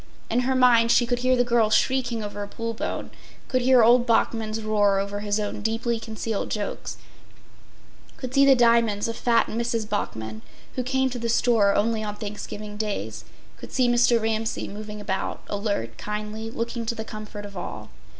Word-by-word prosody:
In 235 - +2
her 260 +1 +1
mind 240 -3 +5
she 240 - +5
could 245 +1 -1
hear 255 +1 +3
the 245 - +3
girls 235 -3 +3
shrieking 245 -4 +1
over 205 0 -5
a 205 - -4
pull 230 +2 -4
bone, 225 - -4 0.4
could 255 -1 +1
hear 250 -1 +6
old 240 +2 +5
Bachman’s 225 -1 +1
roar 205 -2 +3
over 200 +1 -2
his 205 0 -1
own 205 0 -3
deeply 225 +2 -1
concealed 220 -1 -4
jokes, 210 -2 -4 1.2
could 255 -1 -6
see 275 0 +5
the 275 -1 +7
diamonds 230 -4 +3
of 230 - -3
fat 235 0 +3
Mrs. 230 -1 -2
Bachman, 110 - -4 0.3
who 255 - -1
came 265 +1 0
to 245 - -4
the 235 0 -2
store 225 -4 +3
only 220 +1 +1
on 210 -1 -4
Thanksgiving 210 0 -7
days, 210 -1 -4 0.3
could - - -11
see 255 -2 +2
Mr. 240 0 +4
Ramsay 220 0 -1
moving 210 +1 -7
about, 200 -2 -3
alert, 200 - -2
kindly, 210 +1 -4
looking 230 +1 -3
to 235 - -1
the 220 0 -5
comfort 210 -1 -8
of 200 -1 -10
all. - - -7
225 Hz, 180 wpm, -25 LUFS, 210-240 Hz, 1.2 s, the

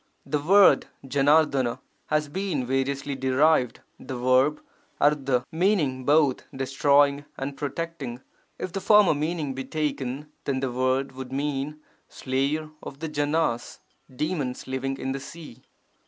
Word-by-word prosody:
The 150 - -1
word 195 +5 +6 0.2
5RF£*I 140 -3 +3 0.3
has 150 -1 +1
been 170 -5 -2
variously 135 +2 -1
derived, 135 0 +2 0.2
the 130 - -6
verb 130 +4 +3 0.4
3^ 135 -4 +2
meaning 160 -8 +1
both 145 -2 +3
'destroying' 140 +1 +2
and 135 +1 -4
'protecting'. 145 -3 -5 0.4
If 185 - -5
the 195 - -3
former 210 -2 +6
meaning 150 -1 -2
be 135 0 -5
taken, 145 0 -3
then 135 -2 0
the 130 -1 -2
word 130 +2 0
would 130 -1 -8
mean 145 +2 -3 0.3
'slayer 140 +4 -2
of 135 - -9
the 160 +2 -5
Janas' 145 -4 -1 0.4
(demons 150 -3 -2
living 135 +1 -3
in 135 - -3
the 135 - -3
sea. 140 -3 -11
140 Hz, 130 wpm, -26 LUFS, 130-155 Hz, 0.4 s, word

